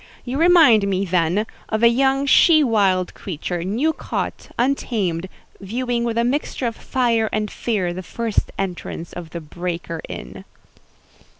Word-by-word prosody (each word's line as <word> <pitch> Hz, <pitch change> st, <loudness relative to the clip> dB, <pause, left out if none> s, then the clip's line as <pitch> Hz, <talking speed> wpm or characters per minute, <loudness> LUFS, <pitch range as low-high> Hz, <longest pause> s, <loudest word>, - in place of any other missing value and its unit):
You 260 Hz, +3 st, -3 dB
remind 320 Hz, -, +6 dB
me, 195 Hz, 0 st, 0 dB
then, 180 Hz, +3 st, +1 dB, 0.2 s
of 220 Hz, +1 st, -1 dB
a -, -, +9 dB
young 270 Hz, +3 st, +2 dB
she 310 Hz, +2 st, +6 dB
wild 195 Hz, -7 st, +2 dB
creature, 175 Hz, -1 st, -4 dB
new 240 Hz, -, 0 dB
caught, -, -, -4 dB
untamed, 210 Hz, -9 st, -1 dB, 0.3 s
viewing 235 Hz, +4 st, -2 dB
with 230 Hz, -1 st, -2 dB
a 235 Hz, -, +3 dB
mixture 265 Hz, +1 st, -1 dB
of 230 Hz, -1 st, -1 dB
fire 230 Hz, -4 st, 0 dB
and 215 Hz, -1 st, -2 dB
fear 195 Hz, -7 st, -1 dB
the 185 Hz, -, -5 dB
first 225 Hz, +3 st, -2 dB
entrance 175 Hz, -3 st, -5 dB
of 175 Hz, -2 st, -7 dB
the 170 Hz, +1 st, -6 dB
breaker 170 Hz, +1 st, -5 dB
in." 60 Hz, -, -8 dB
215 Hz, 145 wpm, -21 LUFS, 180-245 Hz, 0.3 s, a